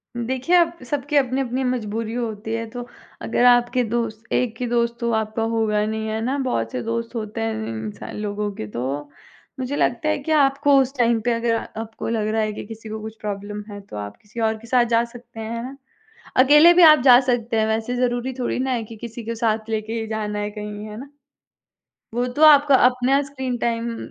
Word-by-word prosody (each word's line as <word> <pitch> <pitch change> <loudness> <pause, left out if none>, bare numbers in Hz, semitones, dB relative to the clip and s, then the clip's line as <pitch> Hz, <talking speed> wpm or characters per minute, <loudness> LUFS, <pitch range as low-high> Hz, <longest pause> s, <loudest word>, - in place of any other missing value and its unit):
देखिए 260 +8 0
अब, 340 0 +2
सबकी 290 +1 -2
अपनी-अपनी 260 -1 +1
मजबूरी 225 -2 -2
होती 225 -2 -4
है, 230 0 -2
तो 245 +1 -7 0.3
अगर 245 - +1
आपके 245 0 +4
दोस्त 225 -1 -3
एक 230 -3 0
ही - - 0
दोस्त 235 0 0
तो 235 -1 -1
आपका 220 +1 -1
होगा 210 -2 +1
नहीं, 220 0 -3
है 220 0 -2
ना? 260 +5 -1
बहुत 180 - -1
से 125 - -3
दोस्त 230 +1 -3
होते 215 - -4
हैं 110 0 -1
इं 110 -1 -5
इंसान 105 - -7
लोगों 210 0 -3
के 110 - -6
तो। 135 +6 -4 0.5
मुझे 260 +2 -2
लगता 250 +2 0
है 305 - +1
कि 315 - -3
आपको 285 -1 +3
उस 265 +1 -2
टाइम 235 -2 +3
पे 240 +2 0
अगर 230 0 0 0.3
आपको 225 0 -7
लग 220 -2 -1
रहा 220 +1 0
है 215 0 -1
कि - - -7
किसी 225 0 -10
को 220 0 -5
कुछ 220 0 -7
प्रॉब्लम 205 0 -5
है 205 0 -7
तो 195 - -12
आप 105 0 -6
किसी 215 +3 -10
और 220 -1 +1
के 230 +2 -14
साथ 245 0 +3
जा 230 0 +2
सकते 240 -1 -11
हैं, 220 0 -5
है 230 - -4
ना? 270 +2 -8 0.6
अकेले 295 +6 +7
भी 360 - +5
आप 305 -2 +9
जा 250 -2 +8
सकते 235 -2 0
हैं 220 - +2
वैसे 220 +3 -1
ज़रूरी 245 +1 -1
थोड़ी 250 - -1
ना 260 +1 -1
है 240 -3 -1
कि 225 +1 -10
किसी 235 +1 -8
को 230 +1 -3
साथ 220 -1 -1
लेके 220 0 -2
ही 220 - -4
जाना 210 -1 -3
है 205 0 -2
कहीं, 210 0 -7
है 215 0 -8
ना? 275 +2 -10 1.1
वो 245 +1 0
तो 250 +5 -3
आपका 290 -2 +7
अपना 255 +2 +2
स्क्रीन 265 -3 -4
टाइम 235 0 -2
230 Hz, 220 wpm, -22 LUFS, 215-250 Hz, 1.1 s, आप